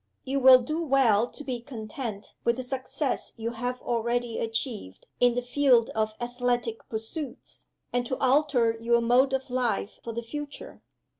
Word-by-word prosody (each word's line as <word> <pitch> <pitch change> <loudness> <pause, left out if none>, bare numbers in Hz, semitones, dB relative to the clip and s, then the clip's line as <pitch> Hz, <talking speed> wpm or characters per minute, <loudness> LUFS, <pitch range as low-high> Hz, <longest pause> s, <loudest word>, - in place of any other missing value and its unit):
You 275 +1 -1
will 255 -1 +8
do 310 +6 -2
well 255 -7 +3
to 295 - -11
be 250 -4 -4
content 220 -3 -6
with 235 0 +2
the 255 - -3
success 260 +2 -3
you 230 +1 -3
have 245 +2 -3
already 235 0 -1
achieved 225 - -3
in 245 -1 +4
the 245 - -1
field 245 -2 +3
of 215 0 -1
athletic 240 -1 -2
pursuits, 235 +5 -6 0.3
and 245 0 +1
to 260 - -2
alter 260 -4 +3
your 235 +1 +3
mode 245 +3 +4
of 265 -1 -2
life 245 -4 -1
for 230 - -4
the 235 +1 -4
future. 295 - -7
245 Hz, 160 wpm, -27 LUFS, 230-265 Hz, 0.3 s, will